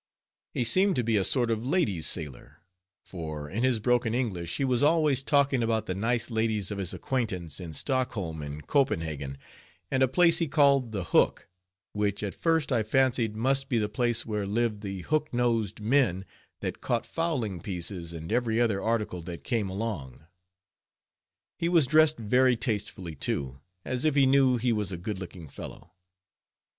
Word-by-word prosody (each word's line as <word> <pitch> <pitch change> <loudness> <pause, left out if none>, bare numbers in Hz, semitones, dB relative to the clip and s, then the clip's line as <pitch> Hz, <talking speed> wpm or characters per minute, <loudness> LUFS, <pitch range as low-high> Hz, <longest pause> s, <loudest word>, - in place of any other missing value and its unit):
He - - +1
seemed 185 - +3
to 125 - +1
be 115 0 +1
a 100 - +3
sort 120 +4 +2
of 110 0 -1
lady's 125 - +1
sailor, 75 -2 -4 0.4
for 80 -4 -6
in 105 +9 -3
his 130 -2 +2
broken 120 0 +1
English 95 -10 -2
he 135 - 0
was 125 -1 +1
always 150 -3 +3
talking 140 -2 +2
about 115 -1 0
the 95 - -2
nice 120 +5 -1
ladies 110 -3 0
of 100 - -4
his 95 -3 -2
acquaintance 95 - -3
in 85 -3 -7
Stockholm 95 - -1
and 75 0 -7
Copenhagen 80 - 0 0.5
and 130 -1 +1
a 130 - +5
place 170 +6 +4
he 165 - 0
called 140 -5 +3
the 100 -4 -3
Hook, - - +2 0.5
which 105 0 -1
at 100 - -3
first 165 -3 0
I 120 -3 +3
fancied 115 -1 +1
must 135 +4 +1
be 120 - +1
the 105 -2 +1
place 120 +1 0
where 105 -3 -2
lived 110 0 0
the 95 -3 -5
hook 155 - -1
nosed 115 -4 0
men 110 -5 +1 0.4
that - - -4
caught - - -1
fowling 125 - -2
pieces 90 -2 -5
and 80 0 -7
every 115 -1 +1
other 110 -5 +1
article 105 -5 -1
that 85 0 -8
came 110 -6 -1
along. 95 - -5 1.3
He 170 - 0
was 170 -5 +4
dressed 155 +2 +4
very 125 +3 +3
tastefully, 105 -7 -3
too, 70 -2 -3 0.3
as 130 0 -2
if 155 -2 +2
he 140 -2 +5
knew 130 -1 +4
he 120 0 +1
was 105 -3 -2
a 90 - -4
good 95 +3 -5
looking 90 -3 -9
fellow. 70 - -10
115 Hz, 175 wpm, -28 LUFS, 95-130 Hz, 1.3 s, a